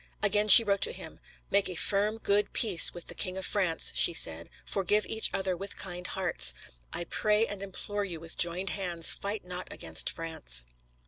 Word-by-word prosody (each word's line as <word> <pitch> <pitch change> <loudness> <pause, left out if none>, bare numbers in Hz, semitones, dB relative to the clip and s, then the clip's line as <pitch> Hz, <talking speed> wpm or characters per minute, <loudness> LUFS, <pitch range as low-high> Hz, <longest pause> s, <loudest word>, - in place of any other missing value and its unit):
Again 210 +1 +1
she 215 +3 +12
wrote 200 -2 -1
to - - +1
him: - - -11 0.3
"Make 200 -1 +1
a 180 - -6
firm, 205 +5 0
good 205 -1 -1
peace 195 -8 +6
with 175 - -9
the - - -9
King 185 -2 -3
of 190 - -5
France," 185 -5 0
she 170 - +4
said; 80 - +1 0.2
"forgive 205 +2 0
each 220 - 0
other 190 -1 -3
with 195 +3 -8
kind 180 -1 -6
hearts"; 175 - +1 0.4
"I 170 - -5
pray 210 +5 0
and 205 -3 -8
implore 205 +1 -6
you, 175 -5 -7
with 165 0 -11
joined 175 +2 -1
hands, 175 -4 -2
fight 200 -1 -6
not 180 0 -8
against 80 -1 -5
France." 160 - -5
190 Hz, 190 wpm, -28 LUFS, 170-205 Hz, 0.4 s, she